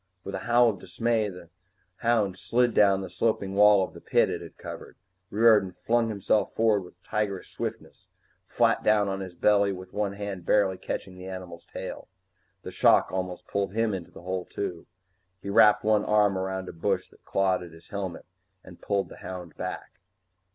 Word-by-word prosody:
With 100 - -6
a 95 - -2
howl 120 0 +5
of 100 - -10
dismay, 110 +3 0
the 90 -2 -12 0.5
hound 110 -5 +1
slid 120 +2 +1
down 100 -2 +4
the 95 - -5
sloping 95 +1 -1
wall 105 -1 +6
of - - -5
the - - -12
pit - - +2
it - - -4
had - - -11
covered. - - -9 0.3
Riordan 105 -4 +4
flung 115 +2 +1
himself 105 0 0
forward 110 -2 +3
with 90 0 -15
tigerish 100 -3 -3
swiftness, - - -6 0.4
flat - - +2
down 105 -1 +3
on 95 0 -3
his 95 -2 -7
belly 100 +1 +3
with 95 -1 -8
one 105 -1 -1
hand 100 -3 -5
barely 95 -1 +2
catching 90 -1 -5
the 90 - -8
animal's 90 -2 -8
tail. - - -7 0.6
The - - -7
shock - - +4
almost 95 -1 -4
pulled 100 -1 -2
him 115 -2 +1
into 90 -4 -5
the - - -14
hole 90 0 -3
too. 90 -4 -5 0.5
He 100 - -5
wrapped 105 +1 +6
one 105 -1 +3
arm 105 -2 +3
around 95 0 -3
a - - -7
bush 80 - -1
that - - -24
clawed 95 -2 +1
at 90 - -8
his 80 +1 -16
helmet 95 -4 -5 0.4
and 90 -2 -14
pulled 100 -1 0
the - - -12
hound 90 -2 -8
back. 90 - -5
100 Hz, 185 wpm, -27 LUFS, 95-105 Hz, 0.6 s, wall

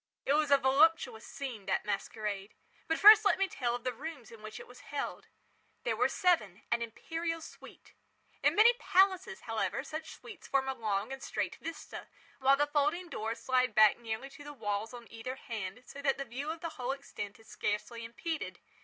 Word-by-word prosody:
It 275 - +3
was 300 0 +3
a 280 - +7
voluptuous 270 -3 +3
scene, 255 -8 -6
that - - 0
masquerade. 210 -1 -3 0.3
But 325 - +1
first 425 +1 +10
let 410 - +4
me 390 0 +2
tell 240 -8 -1
of 245 - -7
the 255 - -1
rooms 280 -1 -8
in 225 -2 -12
which 215 0 -8
it - - -9
was 245 0 -14
held. 285 0 -5 0.6
These - - +1
were - - +2
seven—an 235 - +1
imperial 330 +8 -3
suite. 320 - -13 0.5
In - - +3
many 455 +3 +7
palaces, 380 0 +3
however, 225 +4 -2
such 310 +2 -6
suites 430 -7 -12
form 270 -1 +1
a 265 - 0
long 220 -1 -2
and 270 - -8
straight - - -3
vista, 330 0 -7 0.3
while 270 +1 +5
the 290 - +3
folding 300 +4 0
doors 225 -4 -4
slide 255 -3 +2
back 215 0 +6
nearly 235 +4 -5
to 290 0 -12
the 290 0 -8
walls 205 -3 -2
on 240 -1 -9
either 230 +3 -5
hand, 225 -3 -6
so 280 - -9
that 275 -1 +2
the 275 - -4
view 265 +5 -5
of 325 0 -4
the 335 - -3
whole 250 +2 0
extent 225 -7 -7
is 220 - -19
scarcely 225 +3 -3
impeded. 300 +8 -4
265 Hz, 195 wpm, -32 LUFS, 225-315 Hz, 0.6 s, first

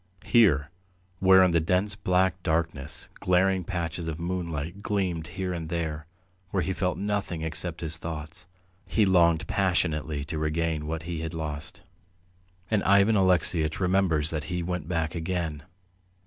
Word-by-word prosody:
Here, 80 - +4 0.5
where 95 0 +7
in 90 - +4
the 85 - +3
dense 90 +5 +1
black 95 -2 +1
darkness 80 -3 -2
glaring 95 +1 +2
patches 85 -2 -3
of 80 0 -4
moonlight 85 0 -3
gleamed 90 -7 -1
here 95 -1 -1
and 80 -2 -5
there, 80 -2 -3 0.4
where 95 -2 0
he 95 - -1
felt 90 0 -1
nothing 100 -5 -2
except 80 +1 -4
his 80 -1 -3
thoughts, 80 +1 -7 0.4
he 110 - +3
longed 85 -4 +4
passionately 80 -6 0
to 80 +1 -4
regain 80 0 -1
what 80 0 -3
he 85 -1 -4
had 80 +1 -4
lost. 75 -2 -5 0.9
And 105 -2 +3
Ivan 100 +3 +5
Alexeyitch 90 -4 +2
remembers 90 -5 +2
that 75 -2 -3
he 90 -1 -2
went 90 -3 -3
back 80 -3 -1
again. 85 -3 -2
85 Hz, 150 wpm, -27 LUFS, 80-95 Hz, 0.9 s, where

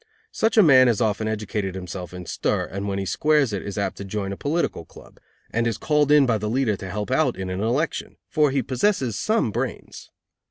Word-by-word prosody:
Such 225 +1 0
a 215 - +8
man 130 -5 +7
has 115 -4 +2
often 110 -1 0
educated 105 -3 -3
himself 90 -1 -6
in 90 -1 -8
stir, - - -1
and, 100 +2 -5
when 100 -1 -2
he 100 - -2
squares 150 +1 +2
it, 100 - -2
is 100 0 -6
apt 100 - -2
to - - -6
join 100 0 -4
a - - -5
political 150 - -2
club, - - -16 0.3
and 115 +1 0
is 115 - -1
called 150 -1 +2
in 150 -2 +6
by 115 -4 +1
the 105 +1 -3
leader 120 -2 +1
to 95 0 -8
help 105 +5 -4
out 130 -4 +2
in 95 -1 -4
an 95 +2 -3
election, 125 +9 -1
for 150 -3 +2
he 135 -1 0
possesses 130 - 0
some 215 - +1
brains. - - -5
110 Hz, 225 wpm, -23 LUFS, 100-140 Hz, 0.3 s, a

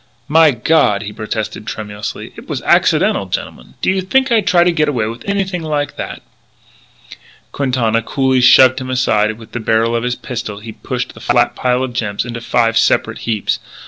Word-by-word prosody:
"My 160 +1 +5
God," 120 -5 +2
he 105 0 -7
protested 110 0 -5
tremulously, 105 -1 -6
"it - - -13
was - - -4
accidental, - - +2
gentlemen. 60 - -6
Do - - +3
you 190 0 0
think 260 +8 +1
I'd 220 -4 +2
try 175 -1 +5
to 175 - +3
get 155 -3 +1
away 120 -7 -1
with 115 - -6
anything 190 -3 -1
like 150 -2 -2
that - - -7 0.7
" - - -21
Quintana 125 -5 0
coolly 130 +1 +1
shoved 130 +1 +6
him 130 - -6
aside 125 -5 +1
and 110 - -5
with 110 -1 -14
the 120 - -4
barrel 115 +1 +1
of 115 - 0
his 125 0 -1
pistol 120 -5 -6
he 110 +1 -9
pushed - - -5
the - - -13
flat - - +1
pile 125 0 0
of 130 -2 -4
gems 110 -3 -2
into 120 -1 -6
five 115 -1 +2
separate - - +1
heaps. 110 -3 -1
125 Hz, 195 wpm, -16 LUFS, 110-150 Hz, 0.7 s, shoved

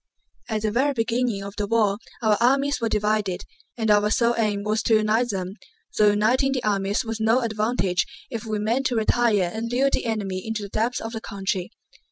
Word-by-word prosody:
At 215 -1 -2
the 215 - +1
very 270 +6 +2
beginning 230 -2 0
of 200 0 -8
the 205 - -1
war 210 -2 +2 0.2
our 215 -1 +4
armies 275 +2 +2
were 230 - 0
divided, 210 -3 0 0.3
and 220 -2 +1
our 210 0 +4
sole 235 +2 +2
aim 210 -3 0
was 215 +1 0
to 225 - +3
unite 215 +3 +2
them, 190 -2 -3 0.4
though 210 -1 +5
uniting 245 +6 +2
the 255 -2 -2
armies 200 +2 0
was 225 0 -4
no 225 +3 +3
advantage 215 -5 0 0.2
if 230 -4 -4
we 220 -2 -2
meant 230 +6 0
to 245 - -2
retire 220 -4 +2
and 230 +1 -4
lure 270 +3 +2
the - - -1
enemy 200 -4 -2
into 220 -2 -3
the 200 - -7
depths 225 +5 -1
of 225 - -5
the 225 -1 -5
country. 195 -3 -3
220 Hz, 205 wpm, -24 LUFS, 205-235 Hz, 0.4 s, though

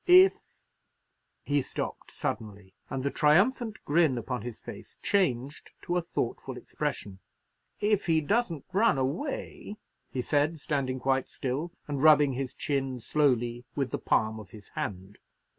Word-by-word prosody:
If—" 370 +2 +8 1.0
he 145 0 +2
stopped - - -5
suddenly, 100 -3 -5 0.2
and 130 -1 -3
the 140 - 0
triumphant 215 - +3
grin 150 -4 +3
upon 120 0 -3
his 120 0 -6
face - - -10
changed 140 -8 0
to 175 - -1
a 180 - +2
thoughtful 170 - -3
expression. 95 -2 -4 0.6
"If 210 -2 +1
he 160 -1 +4
doesn't 170 - 0
run 210 -5 +4
away," 175 - -3 0.3
he 125 - -3
said, 150 +4 +1
standing 135 -3 -1
quite 135 0 +1
still, 140 +6 -3 0.2
and 145 -2 -2
rubbing 150 -2 +6
his 130 0 -4
chin 135 -3 -1
slowly 120 -3 +1
with 135 -3 -1
the - - -2
palm 110 0 +1
of 105 -3 -11
his 105 0 -13
hand. 95 +1 -5
140 Hz, 140 wpm, -29 LUFS, 125-165 Hz, 1.0 s, If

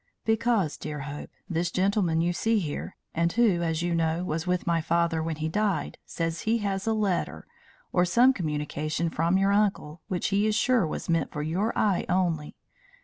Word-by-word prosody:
"Because, 225 -7 +1
dear 150 -1 -5
Hope, 145 +1 -7 0.2
this 170 -2 -1
gentleman 185 -3 +1
you 175 +1 +1
see 225 +5 +1
here, 155 -8 -4 0.2
and 170 +1 +1
who, 220 -7 +3
as 165 -1 -1
you 175 0 0
know, 165 +1 0
was 160 0 -3
with 180 0 0
my 170 -1 +1
father 165 0 +1
when 160 0 -2
he 155 +1 -3
died, 195 -1 -1
says 165 -1 -3
he 225 +2 +1
has 195 +1 -2
a 225 - +3
letter, 205 -4 -1 0.5
or 180 - +4
some 240 +9 +5
communication 155 - -2
from 170 +4 +2
your 195 +1 +3
uncle, 200 -6 0
which 180 -2 -1
he 205 +2 +2
is 215 - +1
sure 235 -5 +3
was - - -5
meant 165 -3 0
for 150 - -3
your 185 +9 0
eye 200 -4 +1
only. 175 -5 0
175 Hz, 190 wpm, -27 LUFS, 160-200 Hz, 0.5 s, some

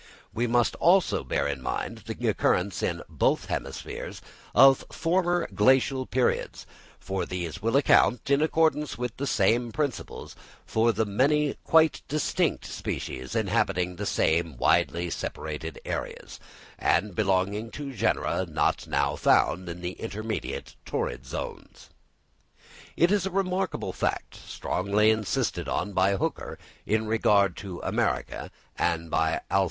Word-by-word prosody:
We 120 +2 0
must, 120 0 +2
also, 185 +2 +3
bear - - 0
in 70 -2 -3
mind - - -3
the - - -3
occurrence - - +1
in - - -2
both - - +1
hemispheres - - -5 0.4
of 135 -1 +7
former 175 +1 +1
Glacial 130 0 +3
periods; 125 -1 0 0.3
for 95 -1 -3
these 85 -2 -5
will 115 +5 +2
account, 125 -3 +4
in 140 +1 +4
accordance 155 -2 +1
with 125 -1 -3
the 140 - -2
same 115 +2 +2
principles, 145 -1 -4 0.3
for 115 +1 +2
the 110 +1 0
many 140 +8 +2
quite 160 -1 +4
distinct 150 0 0
species 65 0 -5
inhabiting 90 0 0
the - - -3
same 80 -3 +1
widely 85 +8 +2
separated 80 0 -5
areas, - - -5 0.4
and 105 -2 +1
belonging 100 +2 0
to 140 +2 -7
genera 105 - 0
not - - 0
now - - +1
found 90 0 +2
in 85 +1 -7
the 90 0 -3
intermediate 110 +2 -5
torrid 65 +1 -3
zones. - - -7 1.1
It 170 +3 +4
is 200 -2 +2
a - - -2
remarkable 190 0 -1
fact, - - -2
strongly 100 +4 0
insisted 110 -2 -1
on 105 - -2
by 95 +1 +3
Hooker - - -3 0.3
in 110 +1 +1
regard 105 -4 +3
to 95 -4 -7
America, - - -1 0.3
and 85 -1 -1
by 80 0 +1
Alph. 95 - +4
110 Hz, 135 wpm, -27 LUFS, 90-140 Hz, 1.1 s, of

